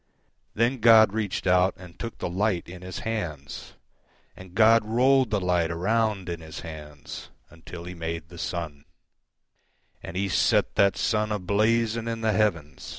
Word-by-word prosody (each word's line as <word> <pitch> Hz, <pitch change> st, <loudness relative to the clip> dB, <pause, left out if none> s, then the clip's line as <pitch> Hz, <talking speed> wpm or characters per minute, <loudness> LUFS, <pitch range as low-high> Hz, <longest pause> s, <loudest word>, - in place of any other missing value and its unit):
Then 120 Hz, +4 st, +1 dB
God 110 Hz, -2 st, +6 dB
reached 105 Hz, -3 st, -2 dB
out 90 Hz, 0 st, +3 dB
and 90 Hz, -1 st, -14 dB
took 115 Hz, -1 st, -6 dB
the -, -, -3 dB
light 95 Hz, 0 st, -1 dB
in 90 Hz, +1 st, -10 dB
His 90 Hz, 0 st, -7 dB
hands, 85 Hz, -11 st, -5 dB, 0.6 s
And 95 Hz, -1 st, -13 dB
God 115 Hz, +1 st, +5 dB
rolled 125 Hz, +3 st, +3 dB
the 105 Hz, -2 st, 0 dB
light 90 Hz, -3 st, +1 dB
around 100 Hz, +3 st, 0 dB
in 85 Hz, -1 st, -5 dB
His 80 Hz, +1 st, -9 dB
handsUntil 80 Hz, +2 st, -10 dB
He 90 Hz, -, -6 dB
made 80 Hz, -1 st, -5 dB
the 85 Hz, -1 st, -11 dB
sun; 80 Hz, -4 st, -5 dB, 1.2 s
And 90 Hz, -, -7 dB
He 100 Hz, +1 st, 0 dB
set 95 Hz, -, +2 dB
that 100 Hz, -1 st, +3 dB
sun 105 Hz, -1 st, 0 dB
a 105 Hz, -, 0 dB
blazing 110 Hz, +4 st, +1 dB
in 115 Hz, -1 st, -3 dB
the 110 Hz, -1 st, +1 dB
heavens. 85 Hz, -9 st, -1 dB
95 Hz, 155 wpm, -26 LUFS, 85-110 Hz, 1.2 s, God